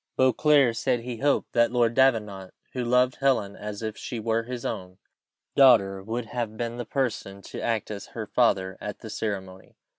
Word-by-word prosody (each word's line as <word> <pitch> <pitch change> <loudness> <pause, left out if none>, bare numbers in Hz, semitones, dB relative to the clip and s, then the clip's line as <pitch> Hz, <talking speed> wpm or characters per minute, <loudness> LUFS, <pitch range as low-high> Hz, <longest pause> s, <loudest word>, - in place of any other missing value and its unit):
Beauclerc 130 -1 +4
said 125 0 0
he 120 0 -6
had 130 - -10
hoped 145 -1 +1
that 120 -1 +3
Lord 120 -2 +2
Davenant, 105 -8 +1 0.2
who 125 - -2
loved 125 +1 +2
Helen 125 -8 +1
as 105 +1 -7
if 110 -1 -3
she 120 - -6
were 115 +1 0
his 120 +1 -6
own 90 0 -5 0.6
daughter, 100 -8 +5
would 115 +4 -4
have 115 -1 -4
been 120 0 -3
the 120 - -4
person 110 -7 -3
to - - -7
act 110 -3 -1
as 100 -2 -6
her 110 - -3
father 95 -6 +1
at 105 - -6
the 110 - -8
ceremony. 95 -4 -5
115 Hz, 185 wpm, -26 LUFS, 105-125 Hz, 0.6 s, daughter